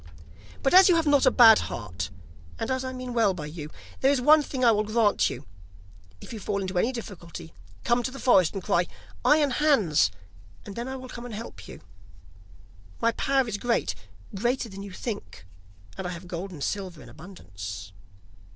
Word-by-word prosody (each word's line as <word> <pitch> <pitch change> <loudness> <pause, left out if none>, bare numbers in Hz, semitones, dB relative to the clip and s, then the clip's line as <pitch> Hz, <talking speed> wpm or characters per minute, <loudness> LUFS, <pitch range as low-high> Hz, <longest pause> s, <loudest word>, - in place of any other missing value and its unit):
But 270 - +2
as 375 +1 +9
you 355 - +5
have 330 -1 +2
not 285 -2 +4
a - - +9
bad 225 -3 +8
heart, 95 -4 -5 0.5
and - - -3
as 260 0 -1
I 260 - -4
mean 255 -1 -6
well 220 -5 +2
by 155 -4 -6
you, 150 0 -7 0.3
there 270 - +4
is 280 - +2
one 300 +5 +6
thing 260 -3 -2
I 230 - +7
will 210 -1 +2
grant 215 -1 +2
you; - - -8 0.7
if - - -10
you 220 - -6
fall 200 0 -2
into 185 -2 -2
any 230 - +1
difficulty, 175 -8 -9 0.3
come 240 +1 +2
to 245 - -2
the 265 - -10
forest 195 -10 +3
and 195 - -4
cry: 175 +1 +1 0.4
"Iron 295 -2 +4
Hans," 240 - +3 0.6
and 200 - -8
then 235 +2 -4
I 265 - -4
will 260 -1 -8
come 245 -1 -8
and 225 - -7
help 105 - -9
you. - - -11 1.2
My 230 - +2
power 270 +2 +1
is 215 -2 -3
great, 235 - 0 0.4
greater 240 +4 -1
than 195 0 -9
you 200 0 -8
think, 105 - -7 0.5
and 190 - -3
I - - -4
have 180 0 -8
gold 180 +2 -5
and 160 -7 -7
silver 190 -5 -4
in - - -14
abundance. 95 - -9
215 Hz, 195 wpm, -26 LUFS, 175-255 Hz, 1.2 s, as